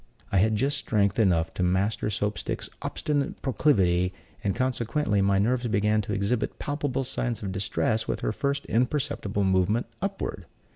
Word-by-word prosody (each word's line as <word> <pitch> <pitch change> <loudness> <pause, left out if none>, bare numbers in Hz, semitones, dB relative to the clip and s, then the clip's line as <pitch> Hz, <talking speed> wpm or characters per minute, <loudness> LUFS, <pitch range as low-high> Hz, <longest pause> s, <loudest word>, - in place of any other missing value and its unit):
I 100 - +3
had 110 +3 +3
just 135 +5 +1
strength 105 -5 +1
enough 85 -6 +3
to - - -3
master 95 +4 +1
Soap 105 +1 -1
stick's - - -4
obstinate 145 -2 -1
proclivity, 95 -10 +2 0.3
and, 100 -2 0
consequently, 125 -3 0
my 100 0 +3
nerves 120 +5 +1
began 105 0 +2
to 105 0 -4
exhibit 100 +4 -1
palpable 145 -2 -2
signs 120 -3 -2
of 95 - -2
distress 100 +3 0
with - - -2
her - - 0
first 140 +5 -1
imperceptible 125 -5 0
movement 95 +4 +2 0.2
upward. 195 0 -3
105 Hz, 155 wpm, -27 LUFS, 100-130 Hz, 0.3 s, I